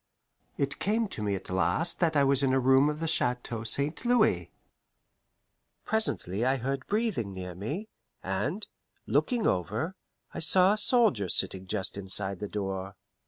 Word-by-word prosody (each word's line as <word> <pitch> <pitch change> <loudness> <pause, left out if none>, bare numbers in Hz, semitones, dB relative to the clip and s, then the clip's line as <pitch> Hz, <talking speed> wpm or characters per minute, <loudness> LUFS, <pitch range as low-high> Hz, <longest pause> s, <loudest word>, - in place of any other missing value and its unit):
It 140 +1 0
came 220 +3 +1
to 110 - -5
me 100 -2 0
at 95 -1 -7
last 95 - +1
that 165 -3 +2
I 140 - +4
was 140 0 +3
in 135 -1 +2
a 135 - +3
room 135 +3 +4
of 150 0 -4
the 165 - -2
Chateau 125 -7 0
St. 140 - +1
Louis. 245 0 +2 1.3
Presently 120 - 0
I 130 +2 +2
heard 135 +1 -3
breathing 205 - -1
near 90 -1 -6
me, 145 - -5 0.4
and, - - -2 0.4
looking 245 -4 +1
over, 105 - -1 0.4
I - - -5
saw 185 +4 +4
a - - -2
soldier 205 - +3
sitting 95 +2 -1
just 95 0 -2
inside 95 -1 +1
the 105 - -4
door. 95 -1 -4
130 Hz, 160 wpm, -28 LUFS, -, 1.3 s, I